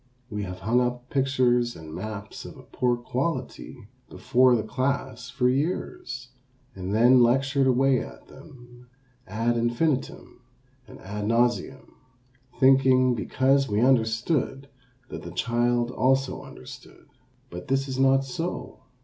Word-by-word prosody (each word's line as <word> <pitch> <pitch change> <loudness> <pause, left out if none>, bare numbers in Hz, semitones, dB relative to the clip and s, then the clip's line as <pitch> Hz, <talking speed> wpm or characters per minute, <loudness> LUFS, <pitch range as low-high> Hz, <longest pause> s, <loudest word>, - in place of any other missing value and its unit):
We 105 -1 -3
have 90 0 -8
hung 115 +5 +2
up 125 0 -3
pictures 125 -3 +1
and 80 -1 -10
maps 105 +3 -7
of - - -11
a - - -13
poor 125 -1 -1
quality 125 -2 -4 0.2
before 130 0 +3
the 110 - -1
class 130 0 -3
for 125 0 0
years, 130 -3 -3 0.4
and 95 0 -6
then 120 +4 +5
lectured 135 +3 +2
away 130 0 +3
at - - -10
them 125 -3 -16 0.4
ad 115 +4 -1
infinitum 125 +3 -2 0.5
and - - -13
ad 105 +2 -5
nauseam, 120 +3 0 0.7
thinking, 130 -1 +5
because 135 +4 +1
we 105 0 0
understood, 130 +3 +1 0.4
that - - -7
the 85 - -8
child 120 +4 0
also 135 +1 +1
understood. - - -13 0.5
But 90 +1 -8
this 135 +1 0
is 130 -1 -4
not 135 0 +3
so. 165 +7 -5
125 Hz, 130 wpm, -25 LUFS, 115-135 Hz, 0.7 s, then